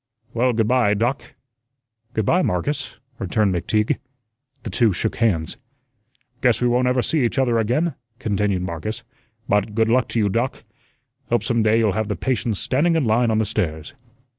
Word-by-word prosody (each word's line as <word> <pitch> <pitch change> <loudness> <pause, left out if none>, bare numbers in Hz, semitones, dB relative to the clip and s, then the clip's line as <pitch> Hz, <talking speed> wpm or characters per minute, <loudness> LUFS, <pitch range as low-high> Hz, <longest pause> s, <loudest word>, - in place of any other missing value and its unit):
"Well, 125 +2 +2
good 110 -1 +1
by, 120 -4 +3
Doc." 120 +6 -2 0.8
"Good 110 - 0
by, 180 - +3
Marcus," 145 - -2 0.2
returned 100 +1 +1
McTeague. 105 +5 0 0.7
The 110 - -5
two 110 +1 +3
shook 110 +5 -2
hands. 95 -9 0 0.8
"Guess 120 -3 +3
we 125 - +2
won't 125 +1 +2
ever 125 -1 +2
see 155 +4 +1
each 120 - 0
other 120 -4 +2
again," 125 +10 +1 0.2
continued 105 -5 -1
Marcus. 95 +7 -5 0.4
"But 105 0 +1
good 110 0 +2
luck 125 0 +3
to 120 - -2
you, 105 - +2
Doc. 115 +6 -2 0.7
Hope 120 - +1
some 115 -2 +1
day 110 +1 +3
you'll 110 -3 +3
have 110 +1 -1
the 105 - -2
patients 120 -4 -1
standing 160 +6 +1
in 160 -5 +1
line 115 +2 +2
on 110 - +1
the 110 - +2
stairs." 80 - -3
115 Hz, 175 wpm, -22 LUFS, 105-125 Hz, 0.8 s, by